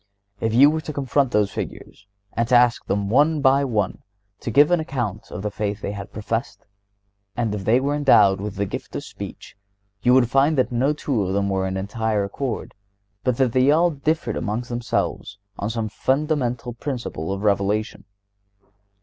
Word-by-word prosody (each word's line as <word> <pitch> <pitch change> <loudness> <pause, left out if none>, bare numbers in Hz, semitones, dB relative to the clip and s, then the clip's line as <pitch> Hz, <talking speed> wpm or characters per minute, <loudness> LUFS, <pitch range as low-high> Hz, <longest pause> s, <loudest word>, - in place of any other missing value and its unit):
If 115 - 0
you 135 +6 +6
were 160 0 -2
to 155 - -6
confront 140 -1 +1
those 105 -1 +2
figures, 100 - -7 0.3
and 115 0 0
to 125 - +3
ask 120 -1 +3
them, 100 0 0
one 150 +8 +3
by 135 0 +4
one, 105 -8 -1 0.4
to - - -5
give 145 +7 +5
an 175 - +4
account 120 -10 -4
of 100 - -7
the 105 - -2
faith 105 0 -3
they - - -3
had 100 0 -7
professed, 115 +4 -4 0.7
and 115 -3 0
if 100 -2 -4
they 120 +3 +4
were 140 +2 0
endowed 105 -10 +4
with 105 +1 -5
the 100 +1 -1
gift - - -7
of - - -3
speech, - - -9 0.5
you 125 +1 +4
would 130 -2 +5
find 140 +5 +3
that 130 - +2
no 125 +4 +2
two 140 -6 -1
of 95 0 -1
them 100 0 +1
were 95 -1 0
in 95 0 -3
entire 105 +1 -1
accord, 115 +4 -4 0.5
but 125 -2 0
that 130 -3 +2
they 130 +3 +3
all 170 +4 +4
differed 155 +2 -1
among 110 +3 -2
themselves 120 -4 -3 0.2
on 100 - -2
some 115 -1 -2
fundamental 130 -1 -1
principle 120 - -4
of 100 +1 -4
revelation. 105 +1 0
120 Hz, 185 wpm, -22 LUFS, 105-135 Hz, 0.7 s, you